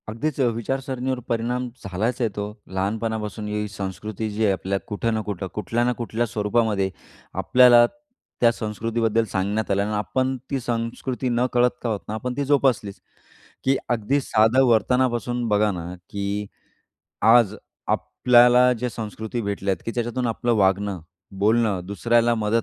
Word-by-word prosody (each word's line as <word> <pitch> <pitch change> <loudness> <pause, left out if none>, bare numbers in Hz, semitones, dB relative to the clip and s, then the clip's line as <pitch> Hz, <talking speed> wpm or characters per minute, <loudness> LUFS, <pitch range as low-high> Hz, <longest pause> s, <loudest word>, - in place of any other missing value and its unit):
अगदीच 130 +7 -3
अ, - - +4
विचारसरणीवर 130 +2 -3
परिणाम 120 +2 -1 0.2
झालाच 105 +7 -2
आहे 115 - +2
तो. 105 - -2 0.2
लहानपणापासून 105 +2 -3
ही 105 0 -2
संस्कृती 105 +2 -5
जी 105 +2 -2
आहे, 100 - +4
आपल्या 95 +2 -2
कुठं 115 +2 -1
ना 110 - 0
कुठं, 100 -3 -4
कुठल्या 110 +4 -1
ना 125 - +2
कुठल्या 120 0 -1
स्वरूपामध्ये 105 -2 0 0.5
आपल्याला 125 -2 +7 0.6
त्या 120 -1 +6
संस्कृतीबद्दल 115 0 -1
सांगण्यात 100 +3 -1
आलं 100 0 +2
आणि 105 +1 -3
आपण 130 +5 0 0.2
ती 135 - 0
संस्कृती 120 +2 -3
नकळत 125 0 +2
का 120 - -2
आहोत 105 -2 -1
ना, 105 - -4
आपण 125 +3 -3
ती 140 - 0
जोपासलीच. 130 -8 +1 0.6
की 135 +1 +3
अ, - - -7
अगदी 120 +5 +1
साधं 115 +2 +3
वर्तनापासून 120 +1 +1
बघा 105 0 +3
ना, 85 -1 -6 0.2
की 100 +1 -3 0.8
आज 110 -1 +5 0.3
आपल्याला 125 0 +4
जे 125 +2 -1
संस्कृती 110 +1 -5
भेटल्या 100 -1 -1
आहेत, 90 - -6
की - - 0
त्याच्यातून 120 +1 -1
आपलं 120 +1 0
वागणं, 100 -1 +1 0.4
बोलणं, 110 -1 +2
दुसऱ्याला 115 +4 +2
मदत 110 +1 +1
115 Hz, 150 wpm, -23 LUFS, 105-120 Hz, 0.8 s, आपल्याला